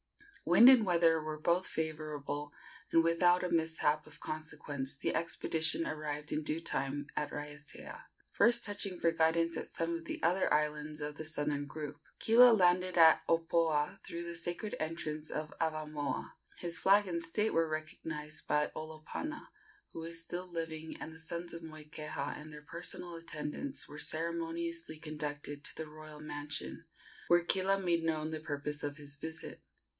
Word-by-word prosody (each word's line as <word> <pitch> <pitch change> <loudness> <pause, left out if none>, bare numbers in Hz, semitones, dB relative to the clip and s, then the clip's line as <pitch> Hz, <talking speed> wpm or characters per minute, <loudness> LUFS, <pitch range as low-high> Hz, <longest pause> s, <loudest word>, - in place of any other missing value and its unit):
Wind 175 +8 +8
and 260 -4 +9
weather 165 -3 +4
were 155 0 -4
both 175 +4 +2
favorable, 150 -2 -3 0.4
and 165 - +6
without 175 +2 +4
a 180 - -1
mishap 160 -2 +2
of - - -14
consequence 145 -3 -4
the - - 0
expedition 165 0 0
arrived 150 -1 -3
in 155 - 0
due 155 +1 -1
time 145 -3 -2
at 150 - -1
Raiatea, 150 0 -7 0.3
first 235 +1 +4
touching 205 -3 -3
for 165 - +3
guidance 165 0 +2
at - - -5
some 165 0 -1
of 165 0 -4
the - - -4
other 180 +3 +3
islands 150 0 +1
of 150 0 -3
the 155 - -5
southern 145 -2 -1
group. 150 -1 -6 0.2
Kila 240 +2 +8
landed 180 -2 +4
at 160 -1 +8
Opoa 165 -2 +2
through 170 0 -5
the 170 0 -4
sacred 175 +5 -2
entrance 155 -1 -3
of 155 0 -4
Avamoa. 155 -2 -2 0.3
His 170 -1 -3
flag 200 +1 +5
and 170 -2 -1
state 210 +7 +1
were 165 -1 +3
recognized 155 0 -5
by 150 0 +2
Olopana, 160 - -5 0.5
who - - -6
was 165 0 -3
still 175 +2 -5
living, 160 -1 -4
and 160 - -6
the 160 - -12
sons 170 +1 -5
of 170 - -6
Moikeha 155 -2 -5
and 155 0 -10
their 150 0 -9
personal 170 +2 -5
attendants 165 - -4
were 150 - -9
ceremoniously 165 0 -1
conducted 150 -2 -5
to - - -4
the 160 - -4
royal 155 0 -10
mansion, 145 - -5 0.4
where 175 0 +5
Kila 195 +2 +2
made 170 -3 +1
known 155 -1 0
the 155 - -3
purpose 150 -1 -3
of 145 0 -3
his 145 -1 -7
visit. 160 +2 -7
160 Hz, 160 wpm, -34 LUFS, 150-170 Hz, 0.5 s, and